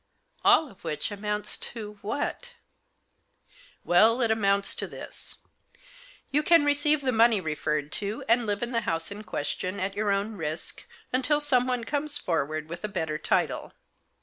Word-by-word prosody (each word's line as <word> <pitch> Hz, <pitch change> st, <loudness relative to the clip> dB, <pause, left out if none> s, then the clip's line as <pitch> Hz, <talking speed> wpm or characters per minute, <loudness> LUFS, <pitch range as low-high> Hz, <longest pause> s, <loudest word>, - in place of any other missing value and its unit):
" -, -, -38 dB
All 315 Hz, -, +6 dB
of 200 Hz, -, -18 dB
which 155 Hz, +3 st, -3 dB
amounts 210 Hz, 0 st, -3 dB
to 210 Hz, -3 st, -6 dB
— -, -, -31 dB
what? 485 Hz, -, -3 dB, 0.6 s
" -, -, -46 dB, 0.5 s
"Well, 220 Hz, +7 st, +5 dB
it 230 Hz, -2 st, +2 dB
amounts 200 Hz, -2 st, +1 dB
to -, -, -4 dB
this. -, -, -8 dB, 1.0 s
You 290 Hz, +2 st, +3 dB
can 330 Hz, -1 st, +5 dB
receive 290 Hz, +1 st, +3 dB
the 260 Hz, -2 st, +1 dB
money 225 Hz, -2 st, +5 dB
referred 150 Hz, -3 st, -2 dB
to, 205 Hz, +2 st, -3 dB
and 230 Hz, 0 st, +3 dB
live 205 Hz, +2 st, -1 dB
in 240 Hz, -, -2 dB
the 230 Hz, -1 st, +1 dB
house 165 Hz, -3 st, -1 dB
in 205 Hz, +1 st, -7 dB
question, 185 Hz, +2 st, -3 dB
at 195 Hz, +1 st, -2 dB
your 210 Hz, 0 st, 0 dB
own 200 Hz, +2 st, 0 dB
risk, 160 Hz, -1 st, -5 dB, 0.3 s
until 290 Hz, +4 st, +3 dB
someone 250 Hz, -4 st, +1 dB
comes 290 Hz, +4 st, -1 dB
forward 155 Hz, -, -2 dB
with 170 Hz, +3 st, -8 dB
a -, -, 0 dB
better 160 Hz, -6 st, -3 dB
title. -, -, 0 dB
210 Hz, 170 wpm, -27 LUFS, 185-255 Hz, 1.0 s, All